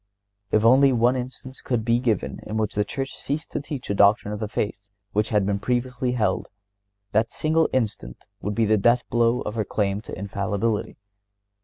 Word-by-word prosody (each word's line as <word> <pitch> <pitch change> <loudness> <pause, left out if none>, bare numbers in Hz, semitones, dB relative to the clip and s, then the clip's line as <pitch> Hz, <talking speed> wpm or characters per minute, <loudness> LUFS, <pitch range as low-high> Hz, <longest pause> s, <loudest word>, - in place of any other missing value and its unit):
If 110 +2 +2
only 135 +3 +6
one 120 +1 +3
instance 130 +1 -6
could 120 -4 -1
be 120 0 +3
given 115 -5 -1
in 110 - -3
which 110 -2 -1
the 105 - +1
Church 135 +5 -4
ceased 150 +3 -4
to - - -2
teach 145 -3 -6
a - - +2
doctrine 105 +2 +4
of 105 0 -4
faith 100 -1 -3 0.2
which 105 +1 +1
had 105 -3 +2
been 100 0 0
previously 125 +2 -1
held, 105 -6 0 0.6
that 110 +2 +2
single 160 +1 +2
instance 105 - -2 0.2
would 105 0 -3
be 115 - +2
the 110 0 +3
death 120 +4 +3
blow 120 +1 +2
of 105 - -4
her 110 -1 -1
claim 100 -1 -1
to - - -8
infallibility. 100 +2 -2
115 Hz, 185 wpm, -24 LUFS, 105-125 Hz, 0.6 s, only